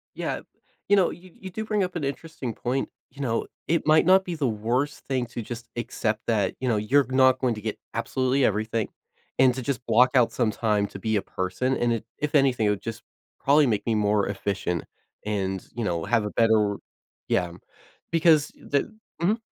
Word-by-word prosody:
Yeah, - - -3 0.5
you 205 - +6
know, 190 -3 +4
you 180 +1 -12
you 190 - -7
do 220 +4 -5
bring 210 -2 +1
up 180 -1 -4
an 160 - -2
interesting 140 -3 -4
point, 130 +5 -2 0.2
you 140 +2 -10
know, 115 -4 -1 0.2
it 165 -1 +1
might 155 +1 +5
not 190 +1 +6
be 175 -2 -3
the 145 -4 0
worst 120 +6 -1
thing 130 -3 0
to 120 0 -6
just 115 +1 -7
accept 110 -2 -2
that, 105 -5 +1
you 130 - -2
know, 110 - +2
you're 130 +6 +3
not 130 0 +4
going 125 -3 +1
to 105 - -8
get 110 0 -3 0.2
absolutely 130 +1 +1
everything, 110 +1 0 0.5
and 130 -1 +6
to 130 - -3
just 125 -2 -3
block 120 +3 +5
out 125 -3 +5
some 115 -4 +1
time 105 -2 +1
to 100 - -9
be 110 +2 0
a 100 - +2
person, 95 +10 -2
and 120 -1 +1
it, 110 -1 -3
if 150 +1 -2
anything, 130 -6 +3
it - - +3
would 105 -2 -1
just 115 0 -6 0.4
probably 145 0 +5
make 105 -3 0
me 115 -2 +1
more 105 -1 +2
efficient 95 -4 -2 0.4
and, 95 -3 -2
you 120 - -2
know, 85 -4 -1
have 115 -3 +2
a 105 - -3
better 110 -3 +3 0.5
yeah, 90 -1 +1 0.6
because 160 -2 +4
the 140 +8 -2 0.3
mhm. 200 +6 +2
120 Hz, 205 wpm, -26 LUFS, 105-140 Hz, 0.6 s, you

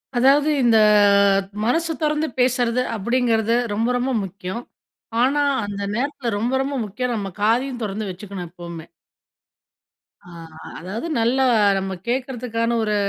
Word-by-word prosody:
அதாவது 275 +5 +4
இந்த 230 -2 +5 0.9
மனசு 325 +8 +1
தொறந்து 305 +1 +1
பேசுறது 250 -1 +2
அப்பிடிங்கிறது 230 0 +1 0.2
ரொம்ப, 225 +3 0
ரொம்ப 250 +2 -1
முக்கியம். 195 +3 -6 0.6
ஆனா, 275 +4 +2 0.2
அந்த 200 0 -5
நேரத்தில 265 -1 -2
ரொம்ப, 235 +5 -1
ரொம்ப 280 +1 -3
முக்கியம் 240 +5 -3
நம்ம 200 -3 -3
காதையும் 245 +4 +1
தொறந்து 210 0 -3
வச்சிக்கணும் 185 -1 -8
எப்பவுமே. 170 -2 -9 1.4
அ - - -16 0.5
அதாவது, 195 - -5
நல்ல 235 +3 +2 0.4
நம்ம 190 0 -3
கேட்கறதுக்கான 240 -2 -1
ஒரு 210 -1 0
235 Hz, 120 wpm, -21 LUFS, 205-255 Hz, 1.4 s, இந்த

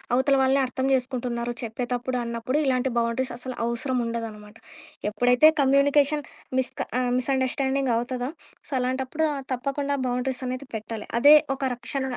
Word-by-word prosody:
అవతల 270 +2 +3
వాళ్ళని 265 +1 +3
అర్థం 260 +1 -3
జేసుకుంటున్నారు 245 -2 -1
చెప్పేటప్పుడు 245 +2 -2
అన్నప్పుడు, 235 +4 -2
ఇలాంటి 260 -1 +1
బౌండరీస్ 235 +2 0
అసలు 255 +1 -6
అవసరం 235 +2 -1
ఉండదనమాట. 225 -2 -6 0.6
ఎప్పుడైతే 245 +7 +5
కమ్యూనికేషన్ 280 +2 +3 0.4
మిస్‌గా 260 - -2
ఆహ్, 250 -1 0
మిస్ 255 +2 -1
అండర్‌స్టాండింగ్ 265 0 0
అవుతదో 245 +1 -2 0.4
సో, - - -15
అలాంటప్పుడు 260 +5 -1 0.3
తప్పకుండా 280 +2 -2
బౌండరీస్ 250 +1 -2
అనేది 255 +2 -4
పెట్టాలి. 220 0 -6
అదే 290 +4 +9 0.2
ఒక 270 - -7
రక్షణ 265 +3 -4
255 Hz, 135 wpm, -25 LUFS, 240-270 Hz, 0.6 s, అదే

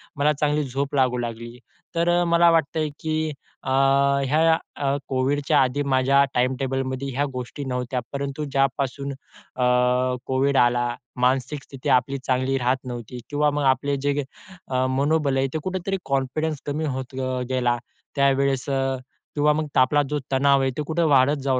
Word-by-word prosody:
मला 145 +1 +2
चांगली 150 +1 0
झोप 140 +2 -3
लागू 130 -2 +2
लागली. 120 0 -5 0.4
तर 175 +1 +2
मला 170 0 +4
वाटतंय, 160 -1 +1
की 155 0 -1 0.3
अ, - - -4 0.7
या 160 0 +4 0.5
कोविडच्या 140 +3 +1
आधी 130 +2 +1
माझ्या 135 0 +3
टाईमटेबलमध्ये 130 +1 -1
ह्या 135 +3 0
गोष्टी 125 +3 -6
नव्हत्या. 125 -1 -2
परंतु 140 +1 -3
ज्यापासून 135 0 0
अ, 135 -1 -8 0.6
कोविड 135 +1 +1
आला, 120 -1 +2 0.3
मानसिक 130 +3 +1
स्थिती 135 -1 -6
आपली 130 +2 +2
चांगली 130 +1 0
राहत 125 +1 +1
नव्हती 120 0 -6
किंवा 150 0 +2
मग 145 0 -1
आपलं 140 +2 +2
जे 145 +1 0 0.4
अ, 130 -1 0
मनोबल 140 +1 +1
आहे, 135 0 +2
ते - - 0
कुठेतरी 185 +1 -2
कॉन्फिडन्स 140 +3 -1
कमी 150 +2 -2
होत 130 -2 -4
अ, 130 -1 -2
गेला. 125 -2 +1 0.4
त्यावेळेस 140 -1 +2
किंवा 135 +2 -1
मग 155 0 -2
आपला 130 +3 +4
जो 150 - -1
तणाव 135 +1 +4
आहे 135 0 +1
तो 150 - -1
कुठे 160 +3 -1
वाढत 135 +2 +3
जाऊ 130 -2 +1
135 Hz, 150 wpm, -23 LUFS, 130-145 Hz, 0.7 s, मला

